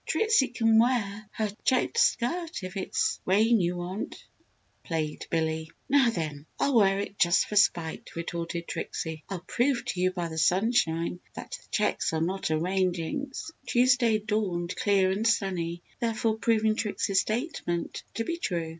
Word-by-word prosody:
"Trixie 435 - +3
can 225 -2 +3
wear 215 -4 +1
her 215 -2 -1
checked 260 - +2
skirt 325 - +1
if 185 0 -6
it's 195 +2 -1
rain 220 +5 +4
you 175 0 0
want," 180 +4 -5 0.6
plagued 155 -2 -3
Billy. 160 -1 -1 0.2
"Now 275 -3 +4
then, 155 -7 -4
I'll 280 - +2
wear 195 -4 +5
it 200 0 -5
just 175 0 +4
for 210 - -6
spite!" 170 -6 +1
retorted 170 0 -4
Trixie. 160 -2 -4
"I'll 190 -3 -4
prove 250 +4 +1
to 180 - -2
you 185 - +4
by 175 -2 -3
the 160 -1 -4
sunshine 175 -2 +2 0.2
that - - -8
the - - -8
checks - - 0
are 160 - +1
not 185 +3 -1
a 155 - +2
rain 185 +2 +1
jinx!" 270 - -4 0.2
Tuesday 245 -2 +4
dawned 205 -5 -2
clear 195 -2 +3
and 210 +4 0
sunny, 175 -6 0 0.2
therefore 225 -1 0
proving 220 0 +2
Trixie's 205 -2 +1
statement 215 - -3
to 230 - -1
be 335 +8 -3
true. 170 - -2
195 Hz, 160 wpm, -28 LUFS, 170-230 Hz, 0.6 s, wear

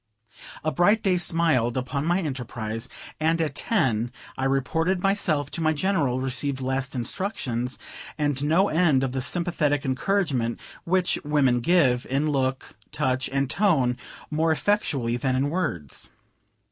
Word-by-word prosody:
A 155 - +1
bright 205 +7 +3
day 185 -2 +3
smiled 160 -8 +2
upon 140 +4 -2
my 175 +3 +2
enterprise, 120 - -4 0.3
and 165 +2 +2
at 155 -4 0
ten 130 - 0 0.2
I 130 - -2
reported 160 +7 0
myself 170 -8 +1
to 170 - -3
my 160 0 +3
General, 145 -6 +1
received 130 +1 -1
last 130 0 -2
instructions 125 - -2 0.4
and 145 -2 0
no 165 +7 +3
end 155 -6 +3
of 135 - -1
the 130 0 -2
sympathetic 150 -2 0
encouragement 135 - 0 0.3
which 180 +1 +1
women 140 -5 +2
give, 130 -4 +3
in 145 +3 +1
look, 130 -1 -1 0.2
touch, 130 -3 0
and 135 0 0
tone 150 -7 +2 0.4
more 160 +1 +2
effectually 145 - 0
than 130 +1 0
in 140 +3 0
words. 85 - -3
145 Hz, 140 wpm, -25 LUFS, 130-170 Hz, 0.4 s, bright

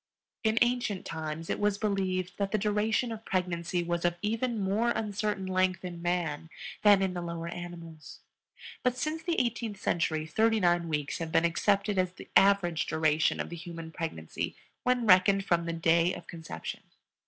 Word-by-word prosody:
In 220 0 +2
ancient 240 -5 -1
times 160 0 -5
it - - -2
was 205 -1 +1
believed 190 -3 -1
that 200 -1 0
the 215 - +2
duration 215 +3 +1
of 220 -1 -6
pregnancy 175 -2 -1
was 170 0 -2
of 175 0 +2
even 230 +2 0
more 205 +4 +1
uncertain 210 -3 -1
length 185 -1 +1
in 175 -1 -6
man 170 -3 -1 0.3
than 205 -2 +6
in 190 -1 0
the 175 - -3
lower 170 -1 -4
animals; 170 -3 -9 0.6
but 250 -1 +1
since 310 +4 -2
the 340 -1 0
eighteenth 230 -4 -2
century 160 -2 0
thirty 220 +7 +2
nine 175 -2 +2
weeks 150 -2 -2
have 165 -1 -4
been 165 - +3
accepted 200 +4 +1
as 185 -1 0
the - - -12
average 195 -4 +4
duration 160 0 +2
of - - -3
the - - -4
human 165 -1 -8
pregnancy 80 - -4 0.3
when 250 -1 +1
reckoned 195 0 +5
from 170 -3 +1
the - - 0
day 165 +1 +2
of - - -10
conception. 165 -2 -7
185 Hz, 175 wpm, -30 LUFS, 170-210 Hz, 0.6 s, than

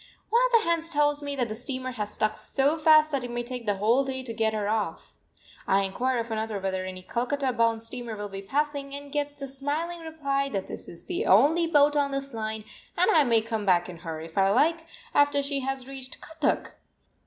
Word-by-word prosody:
One 470 +2 +5
of - - -10
the 455 -4 +4
hands 335 -1 +1
tells 295 -2 +2
me 285 -1 -3
that 250 -3 0
the 215 - -5
steamer 255 +2 -4
has 210 -4 -4
stuck 215 0 0
so 280 +3 +1
fast 310 -1 +5
that 275 -3 -1
it 245 - -5
may 240 0 -3
take 245 -2 -6
the 205 - +2
whole 225 +7 +3
day 260 -1 -4
to 235 -3 -5
get 220 0 +1
her 210 -2 -2
off. 215 0 -2 0.5
I 195 +1 +3
inquire 245 +7 -1
of 230 0 -3
another 220 -1 -2
whether 190 -1 -2
any 185 0 -7
Calcutta 255 +5 -1
bound 230 -1 +1
steamer 235 -1 -5
will 205 0 -4
be 195 -1 -7
passing, 280 +4 -2
and 285 0 -9
get 290 0 -2
the 275 -1 -6
smiling 290 +6 -3
reply 280 -4 -2
that 195 -6 -3
this - - -8
is 170 - -11
the - - -2
only 300 - +5
boat 295 -2 +4
on 285 -1 +2
this 275 -1 -3
line, 220 -1 -3 0.3
and - - +4
I 315 -6 +6
may 230 -4 +3
come 225 -1 -3
back 180 -2 +3
in 175 - -8
her, 165 -2 -5
if 165 +3 -4
I 195 0 +4
like, 325 +9 +2 0.3
after 285 0 +3
she 280 0 -1
has 265 -1 -3
reached 265 -1 -8
Cuttack! 320 -2 -2
260 Hz, 225 wpm, -27 LUFS, 220-290 Hz, 0.5 s, I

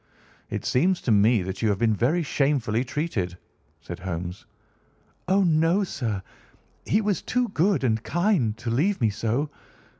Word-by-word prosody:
"It - - -4
seems 175 +8 +2
to 120 - 0
me 105 0 +4
that 95 +1 -5
you 110 - +2
have 100 - +1
been 115 0 +2
very 150 - +1
shamefully 135 -6 +1
treated," 120 - -3 0.4
said - - -8
Holmes. 90 0 -5 0.8
"Oh, 195 +2 +3
no, 165 +3 +3
sir! 115 - -3 0.6
He 210 - +3
was 205 -2 0
too 250 -1 0
good 180 +1 +1
and 110 -3 +1
kind 170 - +1
to 120 0 -4
leave 180 - +1
me 115 -4 +2
so. 115 +7 -1
125 Hz, 155 wpm, -25 LUFS, 110-175 Hz, 0.8 s, me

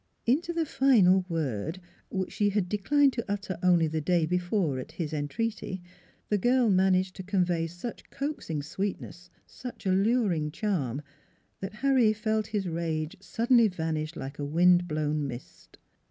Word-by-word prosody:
" - - -45
Into 300 +9 +2
the 335 -1 0
final 195 -11 +4
word 160 - -2 0.3
which 190 -1 -3
she 205 -1 +1
had 200 -2 0
declined 270 +8 +3
to 235 -4 -4
utter 200 -3 -3
only 175 -2 +4
the 160 0 -2
day 170 +1 +2
before 175 -4 0
at 150 +5 -8
his 165 -2 -4
entreaty 190 +6 -3 0.5
the 210 - +1
girl 245 +1 +3
managed 185 0 +2
to - - -5
convey 180 -3 0
such 175 +8 -8
coaxing 275 - -4
sweet 190 +6 -3
ness, 175 0 -11 0.2
such 250 -3 -9
alluring 190 -4 +2
charm 150 - -2 0.6
that 195 +1 -5
Harry 255 -6 +5
felt 215 0 -1
his 205 -3 -2
rage 160 -2 -2
suddenly 235 +3 +3
vanish 160 -3 -3
like 135 0 -7
a - - -2
wind 175 +4 +4
blown 150 -1 -1
mist. 120 -1 -10
185 Hz, 155 wpm, -28 LUFS, 160-215 Hz, 0.6 s, Harry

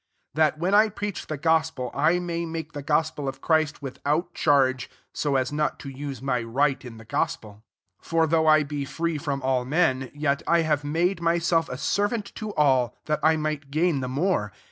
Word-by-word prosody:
That, 155 +1 +2
when 180 +5 0
I 215 +1 +6
preach 205 -1 -5
the 155 - -4
gospel, 160 -4 0
I 155 +5 +3
may 170 -1 -3
make 165 -1 -5
the 145 - -5
gos 155 +2 +1
pel 145 - -6
[iqf 135 0 -4
Christ'] 155 -1 +1
without 145 +5 -2
charge, 130 -2 +2 0.2
so 145 -2 -1
as 130 0 +1
not 150 0 -1
to 135 -1 -7
juse 135 -1 -6
my 125 -3 0
right 135 +5 0
in 120 -3 -9
Uie 110 0 -14
gospel.. 110 - -2 0.5
19 - - -19
For 165 -1 +3
though 160 0 +2
I 155 -1 +6
be 145 0 -4
free 165 +2 -2
from 140 -2 -3
all 130 -1 +1
m^n, 130 -2 +1
yet 145 -1 0
I 170 0 +4
have 150 -3 0
made 170 +5 0
my 170 0 +2
self 165 -1 +1
a 125 - -5
servant 205 - -1
to 215 -2 -5
all, 130 -5 +2
that 150 0 0
I 160 +1 +4
might 155 -2 -3
gain 155 +1 +1
the 130 -1 -3
more. 140 - 0
150 Hz, 210 wpm, -25 LUFS, 135-165 Hz, 0.5 s, I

